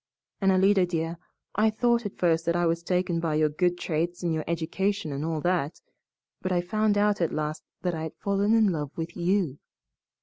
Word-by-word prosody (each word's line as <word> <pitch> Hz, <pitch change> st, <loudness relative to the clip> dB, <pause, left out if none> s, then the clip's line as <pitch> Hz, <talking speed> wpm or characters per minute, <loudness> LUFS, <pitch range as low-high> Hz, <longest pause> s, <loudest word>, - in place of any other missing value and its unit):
And, 195 Hz, 0 st, +4 dB
Alida, 190 Hz, 0 st, +4 dB
dear, 165 Hz, -1 st, -2 dB, 0.3 s
I 215 Hz, +2 st, +3 dB
thought 235 Hz, 0 st, +1 dB
at 200 Hz, -, -12 dB
first 165 Hz, -2 st, +2 dB
that 170 Hz, -, +2 dB
I 175 Hz, 0 st, +2 dB
was 165 Hz, 0 st, +1 dB
taken 180 Hz, -1 st, 0 dB
by 165 Hz, -2 st, -1 dB
your 155 Hz, 0 st, +3 dB
good 175 Hz, +3 st, +1 dB
traits 175 Hz, +2 st, -2 dB
and 170 Hz, -2 st, +1 dB
your 155 Hz, -1 st, -1 dB
education 170 Hz, +2 st, -1 dB
and 140 Hz, +1 st, -3 dB
all 160 Hz, -1 st, -2 dB
that, 175 Hz, -3 st, 0 dB, 0.6 s
but 185 Hz, -, -2 dB
I 180 Hz, -, +2 dB
found 210 Hz, +3 st, +1 dB
out 205 Hz, -2 st, +2 dB
at 170 Hz, -, +1 dB
last 155 Hz, 0 st, -3 dB, 0.2 s
that 180 Hz, -1 st, 0 dB
I 160 Hz, -, -3 dB
had 160 Hz, -1 st, -5 dB
fallen 200 Hz, +2 st, +1 dB
in 220 Hz, -3 st, +4 dB
love 150 Hz, -4 st, -3 dB
with 165 Hz, +1 st, -4 dB
YOU. 175 Hz, -5 st, 0 dB
175 Hz, 205 wpm, -27 LUFS, 160-195 Hz, 0.6 s, And